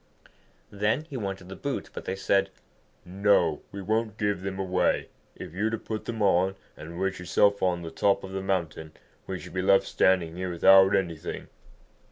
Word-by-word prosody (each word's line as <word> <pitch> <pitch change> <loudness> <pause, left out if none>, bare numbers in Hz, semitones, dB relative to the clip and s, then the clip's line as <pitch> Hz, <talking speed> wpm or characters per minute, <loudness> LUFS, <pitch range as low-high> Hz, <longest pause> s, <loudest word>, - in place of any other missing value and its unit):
Then 105 +8 0
he - - -6
wanted 95 -5 -4
the 95 - -8
boots, 140 -1 -4
but - - -7
they 95 - -2
said, 100 0 +1 0.6
'No, 90 -4 +2
we 100 -1 -7
won't 110 +2 -1
give 105 -3 -1
them 95 0 -4
away. 95 -1 0 0.3
If - - -9
you 100 +4 -1
were - - +2
to 115 - -2
put 110 0 -6
them 115 -2 -3
on 95 0 +3 0.2
and 85 +3 -9
wish 95 0 -1
yourself 100 +3 +2
on 90 -2 0
the 80 - -6
top 100 +4 +1
of 95 - -7
the 95 0 -3
mountain, 85 -5 -3 0.3
we 95 -1 -4
should 90 -2 -11
be 90 - -1
left 95 +1 +4
standing 85 -3 +2
here 90 +1 -3
without 95 +3 +6
anything.' 85 -5 -3
95 Hz, 190 wpm, -27 LUFS, 90-100 Hz, 0.6 s, without